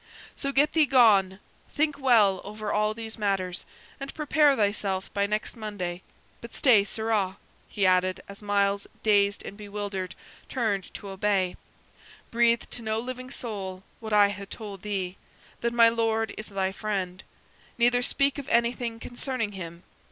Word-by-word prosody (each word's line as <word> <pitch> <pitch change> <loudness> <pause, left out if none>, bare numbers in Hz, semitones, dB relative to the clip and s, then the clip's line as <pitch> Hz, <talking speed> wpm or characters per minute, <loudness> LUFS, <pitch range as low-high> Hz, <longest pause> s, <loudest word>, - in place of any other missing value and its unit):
So 275 - -2
get 290 +3 +3
thee 315 -3 +4
gone, 205 -7 +5 0.3
think 300 -1 0
well 215 -8 +4
over 210 +1 -4
all 215 +1 +1
these 225 0 -7
matters, 190 -3 -1 0.3
and 275 0 -5
prepare 300 -1 +4
thyself 200 -3 -1
by 200 0 +1
next 210 +1 -2
Monday. 195 -6 -5 0.4
But 235 - -10
stay, 230 -7 +5
sirrah," 210 -3 0 0.3
he 200 - 0
added, 185 0 +3
as 200 +1 -11
Myles, 200 -1 +1 0.2
dazed 205 -2 +3
and - - -7
bewildered, 200 -3 -5 0.3
turned 215 -7 -1
to 200 - -7
obey; 195 -1 0 0.8
"breathe 235 0 +3
to 240 - -4
no 220 0 -1
living 255 +1 -6
soul 195 -7 -5 0.2
what 220 -1 -7
I 205 -1 +6
ha' 200 0 -7
told 205 -4 -8
thee 195 -3 -3 0.4
that 235 - 0
my 235 -1 +7
Lord 225 -1 +1
is 215 - -7
thy 190 -1 -1
friend 190 -3 -3 0.6
neither 245 +1 +4
speak 275 +3 +1
of 275 - -7
anything 235 0 +1
concerning 245 -2 -3
him. 170 -3 -8
210 Hz, 150 wpm, -27 LUFS, 195-235 Hz, 0.8 s, my